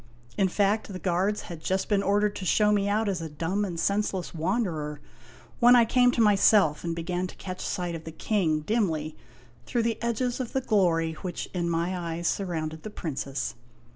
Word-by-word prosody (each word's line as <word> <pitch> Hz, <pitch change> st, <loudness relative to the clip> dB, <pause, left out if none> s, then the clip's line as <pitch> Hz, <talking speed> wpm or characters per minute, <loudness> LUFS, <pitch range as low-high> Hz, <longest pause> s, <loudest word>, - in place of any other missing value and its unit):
In 195 Hz, -, +3 dB
fact, 205 Hz, +3 st, +1 dB
the 185 Hz, -, -5 dB
guards 185 Hz, +3 st, 0 dB
had 170 Hz, -2 st, -9 dB
just 190 Hz, +3 st, -1 dB
been 205 Hz, -2 st, +2 dB
ordered 205 Hz, +1 st, +1 dB
to -, -, -6 dB
show 210 Hz, +3 st, +3 dB
me 200 Hz, -1 st, +2 dB
out 215 Hz, +2 st, +1 dB
as 190 Hz, -4 st, -1 dB
a 160 Hz, -, -5 dB
dumb 165 Hz, +7 st, -2 dB
and 175 Hz, -4 st, -3 dB
senseless 200 Hz, -1 st, -1 dB
wanderer, 165 Hz, -, -2 dB, 0.6 s
when 245 Hz, +1 st, +7 dB
I 240 Hz, -1 st, +6 dB
came 245 Hz, +2 st, +4 dB
to 235 Hz, -, +1 dB
myself, 200 Hz, -6 st, +4 dB
and 170 Hz, -1 st, -2 dB
began 175 Hz, +2 st, -2 dB
to -, -, -12 dB
catch 185 Hz, -1 st, -7 dB
sight 180 Hz, -3 st, -2 dB
of 165 Hz, -1 st, -7 dB
the 165 Hz, -, -6 dB
King 160 Hz, -3 st, 0 dB
dimly 160 Hz, -6 st, -1 dB, 0.5 s
through 240 Hz, -2 st, 0 dB
the 230 Hz, -1 st, -1 dB
edges 235 Hz, +2 st, -1 dB
of 250 Hz, -3 st, -4 dB
the 265 Hz, -, +1 dB
glory 170 Hz, -8 st, +2 dB
which 180 Hz, -2 st, -5 dB
in 175 Hz, -2 st, -1 dB
my 170 Hz, +2 st, 0 dB
eyes 170 Hz, -1 st, -3 dB
surrounded 160 Hz, -5 st, -2 dB
the 215 Hz, -, -6 dB
Princess. 140 Hz, -, -4 dB
185 Hz, 195 wpm, -27 LUFS, 165-210 Hz, 0.6 s, when